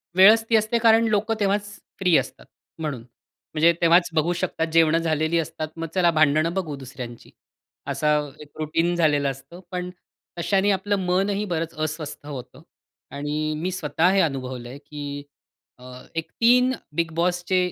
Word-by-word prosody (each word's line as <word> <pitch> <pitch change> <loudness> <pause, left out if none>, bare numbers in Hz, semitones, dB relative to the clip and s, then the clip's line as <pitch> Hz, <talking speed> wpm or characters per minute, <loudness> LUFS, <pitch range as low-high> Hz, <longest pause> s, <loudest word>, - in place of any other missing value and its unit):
वेळच 215 +4 +7
ती 230 - +4
असते 220 +2 +2
कारण 225 0 +6
लोक 215 +1 0
तेव्हाच 205 0 0 0.2
फ्री 180 -3 +3
असतात - - -4 0.3
म्हणून. 150 -6 -3 0.5
म्हणजे 165 +2 +5
तेव्हाच 170 +1 +5
बघू 160 +2 +1
शकतात 170 -2 -2
जेवणं 165 -1 +5
झालेली 160 0 0
असतात. 155 -1 -4
मग 165 0 -4
चला 175 -2 +4
भांडणं 155 +1 +3
बघू 175 -6 -3
दुसऱ्यांची. 125 -3 -9 0.6
असा 150 0 +2 0.2
एक 150 - -12
रूटीन 165 +3 0
झालेलं 145 -4 +2
असतं, 135 +6 -12
पण 180 -1 -3 0.5
तशाने 195 +3 +2
आपलं 200 +1 0
मनही 195 +3 +1
बरंच 165 -1 -2
अस्वस्थ 155 -1 -5
होतं 130 -1 -8 0.5
आणि 150 +2 -2
मी 175 +4 -2
स्वतः 165 -1 +1
हे 195 - +3
अनुभवलंय, 130 -4 -3
की 145 0 -7 0.6
अ, - - -15 0.3
एक 165 -1 -4
3 250 +2 +5 0.2
बिग 165 0 0
बॉसचे 175 +2 0
165 Hz, 150 wpm, -24 LUFS, 150-185 Hz, 0.6 s, वेळच